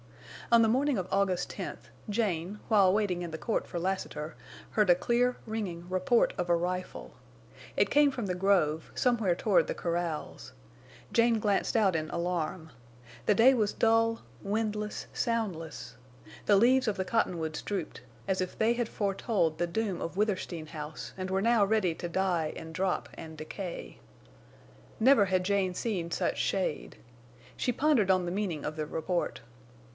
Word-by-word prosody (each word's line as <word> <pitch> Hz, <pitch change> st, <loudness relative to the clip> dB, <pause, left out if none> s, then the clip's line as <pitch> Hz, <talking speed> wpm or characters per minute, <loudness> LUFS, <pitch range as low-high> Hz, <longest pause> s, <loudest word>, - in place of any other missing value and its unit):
On 235 Hz, -1 st, +7 dB
the -, -, +4 dB
morning 265 Hz, +4 st, +2 dB
of 185 Hz, -1 st, -2 dB
August 195 Hz, -2 st, +1 dB
10th, -, -, -7 dB, 0.2 s
Jane, 205 Hz, -3 st, -1 dB
while 200 Hz, -4 st, +5 dB
waiting 195 Hz, -3 st, 0 dB
in 170 Hz, -1 st, -5 dB
the 160 Hz, -, -4 dB
court 210 Hz, +8 st, -2 dB
for 175 Hz, -, -4 dB
Lassiter, 170 Hz, -4 st, -3 dB, 0.4 s
heard 210 Hz, -3 st, +2 dB
a 175 Hz, -, +8 dB
clear, 245 Hz, +6 st, +1 dB
ringing 190 Hz, -6 st, -4 dB
report 185 Hz, +6 st, +2 dB
of 175 Hz, 0 st, -2 dB
a 170 Hz, -, +5 dB
rifle. 180 Hz, +2 st, -3 dB, 0.7 s
It -, -, +3 dB
came 290 Hz, -1 st, +5 dB
from 245 Hz, -5 st, -4 dB
the 180 Hz, -2 st, -2 dB
grove, 175 Hz, -5 st, +1 dB
somewhere 230 Hz, -8 st, +2 dB
toward 200 Hz, +1 st, +2 dB
the -, -, -3 dB
corrals. 170 Hz, -2 st, -3 dB, 0.6 s
Jane 230 Hz, -1 st, +4 dB
glanced 205 Hz, +2 st, +1 dB
out 195 Hz, -5 st, +3 dB
in 155 Hz, -1 st, -2 dB
alarm. 170 Hz, -2 st, -3 dB, 0.6 s
The 210 Hz, -, +5 dB
day 250 Hz, +5 st, +7 dB
was 215 Hz, -5 st, +1 dB
dull, 225 Hz, 0 st, +2 dB, 0.2 s
windless, 210 Hz, 0 st, -2 dB
soundless. 195 Hz, -10 st, -3 dB, 0.5 s
The 205 Hz, -, +6 dB
leaves 255 Hz, +4 st, +4 dB
of 210 Hz, -2 st, 0 dB
the 190 Hz, -, -1 dB
cottonwoods 170 Hz, -6 st, -1 dB
drooped, 195 Hz, -10 st, -4 dB, 0.3 s
as 190 Hz, -1 st, 0 dB
if 185 Hz, -, -4 dB
they 225 Hz, +2 st, +3 dB
had 240 Hz, -1 st, -2 dB
foretold 195 Hz, -5 st, 0 dB
the 175 Hz, -, 0 dB
doom 200 Hz, +1 st, -2 dB
of 170 Hz, +3 st, -5 dB
Withersteen 190 Hz, -6 st, -1 dB
House 150 Hz, 0 st, -7 dB
and 185 Hz, 0 st, -4 dB
were 190 Hz, +1 st, 0 dB
now 230 Hz, -2 st, +4 dB
ready 200 Hz, -4 st, +2 dB
to 175 Hz, -, -5 dB
die 175 Hz, -4 st, 0 dB
and 160 Hz, 0 st, -8 dB
drop 185 Hz, +1 st, -1 dB
and 160 Hz, -1 st, -9 dB
decay. 170 Hz, +3 st, -7 dB, 1.0 s
Never 245 Hz, -3 st, +6 dB
had 185 Hz, -1 st, 0 dB
Jane 190 Hz, -2 st, +1 dB
seen 180 Hz, -7 st, -2 dB
such -, -, -1 dB
shade. 185 Hz, -6 st, -1 dB, 0.6 s
She 250 Hz, -, 0 dB
pondered 245 Hz, -7 st, +3 dB
on 185 Hz, -1 st, +2 dB
the 175 Hz, -, -3 dB
meaning 185 Hz, -6 st, -2 dB
of 150 Hz, -, -3 dB
the 155 Hz, -1 st, -3 dB
report. 170 Hz, -2 st, -2 dB
190 Hz, 165 wpm, -30 LUFS, 175-220 Hz, 1.0 s, a